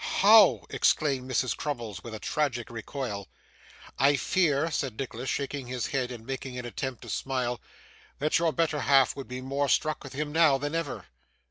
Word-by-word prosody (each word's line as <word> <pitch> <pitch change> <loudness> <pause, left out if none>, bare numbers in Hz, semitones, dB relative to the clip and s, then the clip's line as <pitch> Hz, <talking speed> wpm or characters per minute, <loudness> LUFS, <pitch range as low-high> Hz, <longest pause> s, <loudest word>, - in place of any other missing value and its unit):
'How!' 210 -1 +6
exclaimed 135 -4 +1
Mrs. 130 -1 0
Crummles, 115 -10 -5
with 115 -2 -7
a - - -7
tragic 130 -5 -2
recoil. 115 -3 -5 0.7
'I 140 +2 +5
fear,' 160 +1 +1
said 130 -6 -2
Nicholas, 130 -1 -4
shaking 140 -2 -3
his 125 -1 -3
head, 130 -2 -2
and 115 -2 -9
making 130 -1 -5
an 125 - -5
attempt 130 0 -5
to - - -10
smile, 125 -2 -2 0.6
'that 150 +3 +1
your 165 -1 +2
better 160 -2 0
half 135 -2 +4
would 135 - -7
be 125 +1 -6
more 140 +2 -1
struck 155 -1 +1
with 135 - -9
him 150 +2 -3
now 160 -3 +5
than 145 +2 -4
ever. 145 - -3
135 Hz, 175 wpm, -28 LUFS, 125-150 Hz, 0.7 s, How